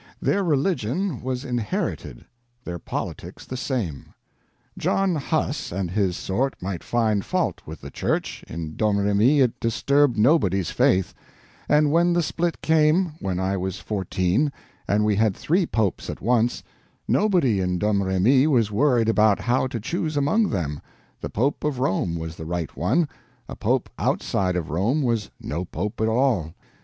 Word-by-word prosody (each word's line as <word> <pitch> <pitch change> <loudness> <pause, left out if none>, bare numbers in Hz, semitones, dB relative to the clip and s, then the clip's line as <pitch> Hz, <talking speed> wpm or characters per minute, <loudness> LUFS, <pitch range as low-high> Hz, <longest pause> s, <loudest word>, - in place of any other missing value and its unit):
Their 200 - +1
religion 160 - 0
was 130 +1 -3
inherited, 120 - -3 0.4
their 85 -4 -5
politics - - -6
the 130 - -6
same. 115 - -4 0.6
John 195 -2 +1
Huss 150 -1 -1
and 90 -1 -3
his 95 -2 0
sort 130 +8 -1
might 95 -1 -4
find 110 -4 +1
fault - - -1
with 80 +1 -8
the 70 - -9
Church, - - -2
in 80 -1 -6
Domremy 105 +6 +3
it 125 -3 +1
disturbed 130 +3 +2
nobody's 105 - +3
faith; 95 -2 +2 0.6
and 150 0 +4
when 170 +2 +3
the 175 0 +2
split 170 +2 -2
came, 160 +2 +3
when 95 -2 -2
I 95 +1 0
was 95 0 -3
fourteen, 95 - 0 0.4
and 105 +1 +2
we 105 -2 +2
had 110 -3 +2
three 175 +2 +1
Popes 110 -5 -1
at - - -5
once, 120 +1 +1 0.4
nobody 175 - +2
in 90 -1 0
Domremy 105 - +3
was 120 -8 +2
worried 120 0 +2
about 110 -2 +3
how 125 +2 +1
to 120 -2 -4
choose 155 - -2
among 180 +11 +2
them—the 75 -7 -6
Pope 135 +7 -1
of 150 -3 -1
Rome 95 -8 0
was 80 0 -6
the 80 - -7
right 85 -1 -4
one, 150 - +1 0.4
a - - -7
Pope - - 0
outside 95 -2 0
of 85 -2 -3
Rome 115 - +1
was 115 -4 0
no 85 +5 -4
Pope 95 +5 -4
at 110 - +2
all. 110 - +1
110 Hz, 155 wpm, -24 LUFS, 95-145 Hz, 0.6 s, and